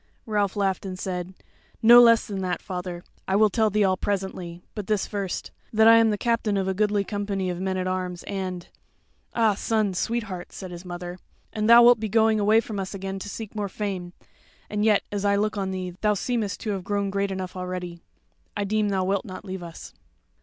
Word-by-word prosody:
Ralph 205 -3 0
laughed 195 -2 0
and 185 -2 -5
said: 185 0 -4 0.5
"No 240 +2 +10
less 230 -1 +6
than 195 -2 -4
that, 180 -1 -1
father; 180 -2 -6 0.2
I 190 - +1
will 215 0 +4
tell 220 0 +2
thee 210 0 +2
all 185 -1 +2
presently; 185 -3 -3
but 210 -3 -6
this 210 -3 +1
first, 200 -3 -4 0.2
that 220 0 +5
I 230 0 +9
am 225 -1 +5
the 210 - 0
captain 230 -2 0
of 190 -1 0
a 190 - +1
goodly 205 +1 +1
company 200 -2 -2
of 175 - -5
men 190 0 -1
at 185 - -1
arms; 185 -1 -3
and" 185 -3 -4 0.7
"Ah, 225 -3 +4
son, 215 -1 0
sweetheart," 200 -2 -3
said 185 -2 -8
his 175 0 -8
mother, 175 0 -7 0.3
"and 215 0 0
thou 235 +1 +9
wilt 240 -1 +7
be 220 0 -3
going 220 0 +3
away 215 +2 +4
from 215 -3 -5
us 190 +1 -4
again 195 0 -5
to 205 - -7
seek 220 0 -7
more 205 -2 -3
fame: 185 -3 -4 0.6
and 210 0 0
yet, 215 -2 +4
as 205 -1 -2
I 200 0 +3
look 210 +1 0
on 195 -2 -2
thee 185 -1 -4
thou 210 -1 +3
seemest 220 -1 -2
to 215 - -2
have 195 -2 -3
grown 200 0 -1
great 200 0 0
enough 190 -1 -5
already. 180 -1 -5 0.6
I - - 0
deem 210 +1 +1
thou 190 -2 0
wilt 195 +1 0
not 185 -2 -8
leave 190 -1 -5
us." 170 -1 -9
200 Hz, 215 wpm, -25 LUFS, 185-215 Hz, 0.7 s, No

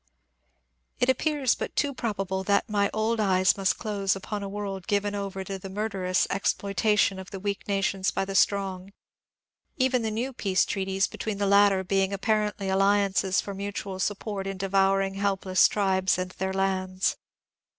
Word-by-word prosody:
It 250 - +2
appears 275 0 +2
but - - -5
too 285 -1 +1
probable 195 -6 -2
that 200 +4 +2
my 205 -2 +1
old 220 +1 0
eyes 185 -3 +3
must 195 -1 +1
close 200 -3 -1
upon 205 +2 -5
a 200 - -5
world 195 -2 -5
given 205 0 0
over 195 -1 -4
to 195 0 -6
the 195 - -8
murderous 190 -2 0
exploitation 200 0 +1
of 190 - -9
the 195 - -7
weak 200 +1 -4
nations 195 -1 0
by 195 - -1
the 195 - -5
strong, 195 -1 +1 0.4
— - - -67 0.3
even 255 -2 +2
the 220 - -1
new 240 +5 -3
peace 195 -5 +1
treaties 195 0 0
between 215 -2 -4
the 200 - 0
latter 200 -1 +4
being 195 +1 +1
apparently 210 -1 0
alliances 195 0 +2
for 200 - -6
mutual 200 -1 -5
sup 205 +1 0
port 195 -3 -5
in 195 -1 -4
devouring 195 0 +2
helpless 195 -1 +2
tribes 190 -2 +1
and 185 0 -3
their 190 +1 -3
lands. 190 -1 0
195 Hz, 170 wpm, -27 LUFS, 190-205 Hz, 0.4 s, latter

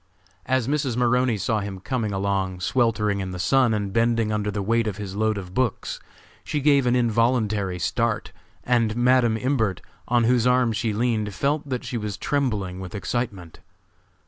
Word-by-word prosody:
As 130 -2 +1
Mrs. 140 -4 0
Maroney 125 -1 +2
saw 105 +3 0
him 100 -2 -5
coming 115 0 -2
along 95 -2 -1
sweltering 105 -3 +1
in 95 -1 -3
the 90 - -6
sun 130 +6 +3
and 100 -3 -2
bending 115 -1 +2
under 105 -1 -1
the 100 -1 -3
weight 115 +2 +1
of 100 -2 -3
his 100 -2 -6
load 110 0 +1
of 90 -2 -7
books, 125 -1 -1 0.4
she 150 - -2
gave 140 -2 +3
an 120 - +3
involuntary 110 -5 +1
start, 85 - -1 0.3
and 115 -3 +1
Madam 120 -2 +3
Imbert, 115 -6 0 0.3
on 120 0 +3
whose 120 0 +3
arm 125 -2 +3
she 110 +1 -1
leaned, 110 -2 -1
felt 145 +5 -1
that 125 -2 -2
she 120 - -3
was 105 -2 -4
trembling 105 -11 -1
with 95 +3 -7
excitement. 100 -6 -4
115 Hz, 170 wpm, -24 LUFS, 100-125 Hz, 0.4 s, sun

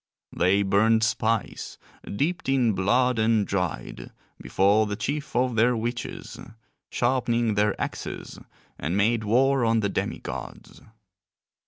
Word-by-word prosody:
They 95 +3 +3
burned 110 +3 +3
spice, 110 0 -1 0.3
dipped 150 - -2
in 125 -5 +2
blood 120 +6 +2
and 110 -1 +2
dried, 90 -6 -4 0.3
before 100 +3 +2
the 105 - -3
chief 145 +6 -4
of 125 -1 +1
their 120 +2 +3
witches, 120 +2 -5 0.5
sharpening 120 -2 0
their 105 0 +1
axes, - - -5 0.4
and 80 +7 -2
made 110 +2 +2
war 130 +4 +2
on 115 -1 +2
the 100 - 0
demi - - -2
gods. - - -9
110 Hz, 125 wpm, -25 LUFS, 100-120 Hz, 0.5 s, They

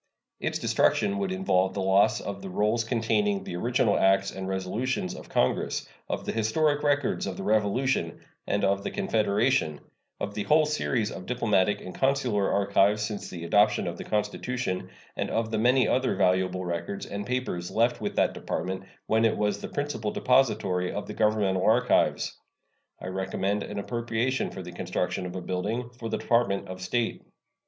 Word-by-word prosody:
Its - - -1
destruction 205 0 +2
would 195 -2 -1
involve 95 - +1
the - - -2
loss 95 +1 +3
of 100 -1 -5
the 95 - -6
rolls 105 +5 +1
containing 165 - 0
the 85 - -6
original 120 +3 +2
acts 95 0 +3
and 95 0 -6
resolutions 95 +3 -2
of - - -10
Congress, 65 - 0 0.2
of - - -3
the - - -1
historic 145 +7 +1
records 145 -6 +1
of 95 - -4
the - - -5
Revolution 110 -2 +1 0.3
and 100 - 0
of 100 0 +1
the - - -2
Confederation, 110 - +1 0.4
of 100 - -3
the 105 - -3
whole 155 0 +5
series 130 -7 0
of 90 - -8
diplomatic 105 -5 +1
and 90 - -8
consular 130 -7 +1
archives 100 +1 +3
since 105 -2 -4
the 85 -2 -7
adoption 105 +4 +3
of 85 -1 -3
the - - -4
Constitution, 105 -1 -2 0.3
and - - -2
of 110 0 -1
the 110 - 0
many 125 +3 +4
other 130 0 +1
valuable 90 0 +1
records 85 +3 -3
and 100 0 -5
papers 125 -7 -2
left 115 +2 +1
with - - -3
that - - +2
Department 95 0 -3 0.2
when 110 +1 +2
it 115 -1 +3
was 105 -1 0
the - - -4
principal 145 -7 -2
depository 110 -9 +2
of 105 - -4
the - - -7
governmental 105 -4 +1
archives. 125 +2 +2 0.6
I - - -9
recommend 95 +2 -1
an 105 - -6
appropriation 120 +4 -1
for 95 - -7
the 90 - -8
construction 90 +1 -2
of 90 - -8
a 95 - -3
building 105 +8 -3
for 115 - -4
the - - -1
Department 115 -6 +1
of 95 0 -7
State. 115 +5 -1
105 Hz, 175 wpm, -27 LUFS, 95-125 Hz, 0.6 s, whole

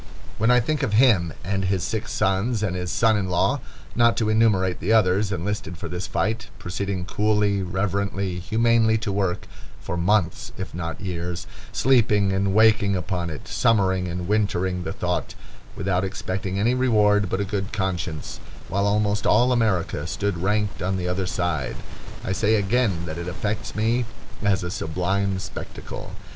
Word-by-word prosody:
When 110 +2 +3
I 125 0 +6
think 150 +5 -1
of 125 -7 -1
him, 105 -8 +4
and 95 +1 -1
his 95 -2 0
six 110 +5 -3
sons, 105 +4 +1
and 95 -4 -1
his 90 -1 -3
son 110 -2 +3
in 95 -3 -1
law, 90 - +2 0.4
not 120 0 +4
to 110 -2 +1
enumerate 105 -5 +2
the 95 - -1
others, 100 -1 +3
enlisted 95 -1 -3
for - - -5
this 90 +2 -4
fight, 100 +6 -1
proceeding 95 0 -3
coolly, 105 0 +1
reverently, 95 0 -1
humanely 110 +3 +3
to 110 -2 -3
work, 95 -2 -1 0.3
for - - -4
months 105 +4 +1
if 95 - -6
not 85 -1 -4
years, 90 -2 -4 0.3
sleeping 105 -6 +3
and 95 0 +1
waking 110 -2 +5
upon 90 -1 -2
it, 75 - -8
summering 95 -5 +2
and 90 0 -4
wintering 95 -3 0
the - - -2
thought, - - -2 0.4
without 95 -1 0
expecting 95 0 -3
any 115 +5 +2
reward 105 -6 +3
but 95 - -1
a 100 - 0
good 100 0 -3
conscience, 90 -7 -3 0.3
while 100 +1 +1
almost 105 0 +1
all 125 +1 +4
America 95 -10 +1
stood 100 -1 -2
ranked 105 +1 0
on 95 +1 0
the 90 -1 -2
other 90 +1 -1
side—I 85 0 -4
say 105 +3 +2
again 100 -4 +1
that 80 -1 -5
it 85 - -5
affects 100 +4 -3
me 115 +3 +1 0.4
as 100 -2 +1
a 90 - -3
sublime 95 +4 -1
spectacle. 95 - -7
100 Hz, 165 wpm, -24 LUFS, 90-110 Hz, 0.4 s, I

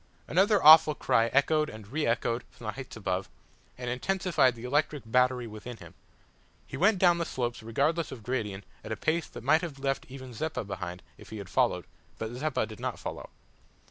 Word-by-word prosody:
Another 200 +5 +3
awful 155 0 +9
cry 115 -4 +2
echoed 150 +5 +2
and 110 -1 -10
re 150 +4 -1
echoed 115 +1 0
from 115 - -14
the 110 - -1
heights 130 +3 -9
above, 95 -3 -2 0.5
and 125 -1 -6
intensified 140 0 +1
the 115 - -11
electric 145 +2 0
battery 125 +1 +2
within 115 +2 -8
him. - - -13 0.7
He - - -8
went 200 +4 +3
down 175 -2 +4
the - - +1
slopes 120 -7 -3
regardless 145 +9 0
of 125 -5 -9
gradient 105 -6 -3 0.2
at 110 - -8
a 110 - -2
pace 165 +1 0
that - - -10
might 160 +1 +4
have 160 -6 -6
left 135 0 -2
even 130 -1 -9
Zeppa 155 +5 -3
behind 95 -3 -6 0.2
if - - -13
he 110 - -7
had 100 -3 -8
followed; - - +1 0.3
but 110 0 -4
Zeppa 145 +3 -1
did - - -11
not - - -3
follow. - - -7
130 Hz, 195 wpm, -29 LUFS, 115-155 Hz, 0.7 s, awful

